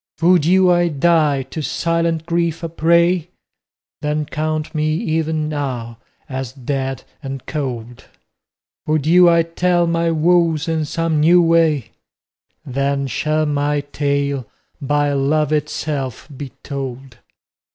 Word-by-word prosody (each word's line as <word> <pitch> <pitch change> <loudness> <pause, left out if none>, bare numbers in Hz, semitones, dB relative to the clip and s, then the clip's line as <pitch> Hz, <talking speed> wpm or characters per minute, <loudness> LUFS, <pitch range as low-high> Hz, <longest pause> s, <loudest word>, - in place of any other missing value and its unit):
Would 170 -2 +4
you 185 0 +5
I 175 0 +3
die, 150 -3 +2
to 135 +5 -6
silent 165 +1 -1
grief 170 -1 -1
a 165 - -2
prey? 170 +1 +2 0.7
Then 150 0 -1
count 155 0 -3
me 155 0 0
even 160 -4 -1
now 125 -6 -4 0.3
as 130 -2 -5
dead 135 -1 -3 0.2
and 135 -2 -6
cold; 125 -5 -5 0.8
Would 155 -2 +1
you 175 +2 +6
I 170 -1 +4
tell 175 +1 +1
my 170 0 +1
woes 165 -1 +2
in 160 -1 0
some 165 0 -1
new 170 +4 +5
way? 165 -7 +2 0.7
Then 140 +1 -1
shall 155 +4 0
my 145 0 0
tale 140 -3 -2 0.3
by 145 +1 +1
Love 150 +2 +1
itself 145 -4 -3
be 140 0 -6
told. 135 -3 -6
155 Hz, 125 wpm, -19 LUFS, 140-165 Hz, 0.8 s, you